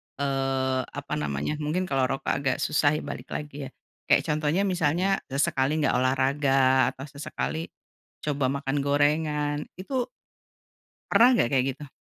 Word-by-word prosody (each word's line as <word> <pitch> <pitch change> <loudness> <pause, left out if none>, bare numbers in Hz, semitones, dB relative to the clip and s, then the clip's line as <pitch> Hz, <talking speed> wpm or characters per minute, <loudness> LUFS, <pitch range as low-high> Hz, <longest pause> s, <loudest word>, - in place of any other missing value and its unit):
eee, 135 -1 0
apa - - -7
namanya 75 - -2
mungkin 155 +5 -1
kalau 135 -7 +1
rokok 135 - -2
agak 135 -2 0
susah 150 0 +2
ya 155 - -3
balik - - -7
lagi 145 -2 -6
ya, - - -11 0.4
kayak - - +4
contohnya 155 +4 +1
misalnya 185 +1 +1
sesekali 135 +1 +1
enggak 140 - +2
olahraga 130 0 +3
atau 135 - -8
sesekali, 155 +3 -4 0.6
coba 145 -3 0
makan 140 0 -2
gorengan 145 +1 +1 0.2
itu 245 +7 -2 1.0
pernah 240 +2 +7
gak 120 - +3
kayak 130 -2 +3
gitu? 145 - -10
145 Hz, 140 wpm, -26 LUFS, 135-150 Hz, 1.0 s, pernah